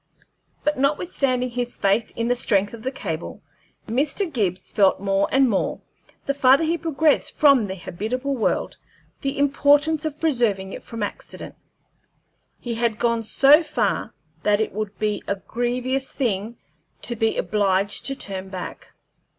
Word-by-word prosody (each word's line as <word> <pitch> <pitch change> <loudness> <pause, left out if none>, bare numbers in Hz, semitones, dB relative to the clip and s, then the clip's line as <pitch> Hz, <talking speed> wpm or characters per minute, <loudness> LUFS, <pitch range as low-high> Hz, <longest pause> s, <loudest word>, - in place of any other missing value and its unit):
But 300 -2 0
notwithstanding 275 -4 0
his 245 0 -3
faith 200 +3 +1
in 230 0 -1
the 245 - +3
strength 205 -4 +1
of 230 - -9
the 255 - -2
cable, 170 -11 -5 0.4
Mr. 290 - 0
Gibbs 190 -7 -1
felt 195 -2 +3
more 195 0 +1
and 270 0 +4
more, 205 -5 0 0.5
the 280 - 0
farther 275 +2 +5
he 325 +1 +1
progressed 315 -2 +1
from 275 -8 +5
the 190 - -4
habitable 245 +10 -3
world, 230 - -1 0.4
the 275 -1 -2
importance 290 +2 +3
of 305 -1 -4
preserving 230 -11 0
it - - -7
from 230 -2 -6
accident. 205 - -6 1.1
He 240 - -4
had 230 -1 0
gone 230 0 +1
so 275 +7 +6
far 245 - -1 0.3
that 205 +2 +2
it 220 - -1
would 210 0 -4
be 210 -1 -1
a 200 - 0
grievous 250 +5 -2
thing 225 -3 -2 0.5
to 240 - 0
be 225 0 0
obliged 200 -1 0
to 275 - -2
turn 190 -6 -4
back. 185 -2 -8
240 Hz, 150 wpm, -23 LUFS, 205-275 Hz, 1.1 s, so